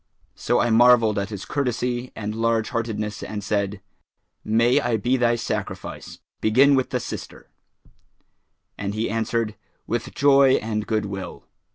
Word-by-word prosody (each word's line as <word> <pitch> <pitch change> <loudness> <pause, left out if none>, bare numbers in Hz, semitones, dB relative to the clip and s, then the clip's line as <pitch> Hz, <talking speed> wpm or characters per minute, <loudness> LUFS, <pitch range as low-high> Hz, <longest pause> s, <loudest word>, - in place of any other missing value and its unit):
So - - 0
I 120 - +2
marvelled 115 -2 +5
at 100 +1 -3
his 105 -3 -6
courtesy 125 -2 -2
and 105 -1 -4
large 115 0 0
heartedness 110 -3 -3
and 105 -1 -5
said, 100 0 -2 0.6
'May 115 +3 +3
I 120 -2 0
be 120 +5 +1
thy 120 -2 +2
sacrifice! 115 - -5 0.2
Begin 130 +6 +5
with 130 -2 +1
the 125 - -1
sister;' - - -8 1.3
and 100 +1 -3
he 110 0 -1
answered, 115 0 -1 0.3
'With 120 +1 -4
joy 140 -1 +5
and 110 -3 -1
goodwill.' 100 -4 -4
115 Hz, 140 wpm, -23 LUFS, 105-120 Hz, 1.3 s, marvelled